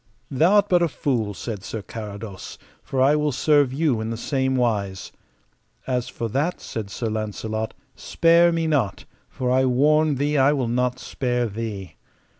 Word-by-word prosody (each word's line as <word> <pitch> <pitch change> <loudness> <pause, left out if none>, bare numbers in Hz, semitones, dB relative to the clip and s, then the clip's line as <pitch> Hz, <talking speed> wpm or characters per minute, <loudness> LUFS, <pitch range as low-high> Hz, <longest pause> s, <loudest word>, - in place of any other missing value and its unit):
Thou 160 +8 +3
art 205 0 +4
but 180 -3 +3
a 170 - +3
fool, 120 -7 -2
said 105 -3 -6
Sir 110 -1 -5
Carados, 105 -3 -8 0.2
for 130 -1 0
I 145 +3 +5
will 150 -1 +1
serve 145 0 +3
you 135 -5 0
in 110 - -3
the 115 - -3
same 130 +1 -1
wise. 105 -7 -1 0.7
As 125 -2 -1
for 115 - -4
that, 145 +10 -1
said 110 -3 -6
Sir 115 - -5
Launcelot, 110 0 -3 0.2
spare 170 +1 +4
me 165 -1 0
not, 145 -10 0 0.2
for 125 -1 -2
I 130 +1 +3
warn 150 +4 +3
thee 145 +2 0
I 135 +2 +5
will 130 -5 -1
not 125 +1 0
spare 125 -1 -2
thee. 100 -5 -6
125 Hz, 170 wpm, -23 LUFS, 110-145 Hz, 0.7 s, I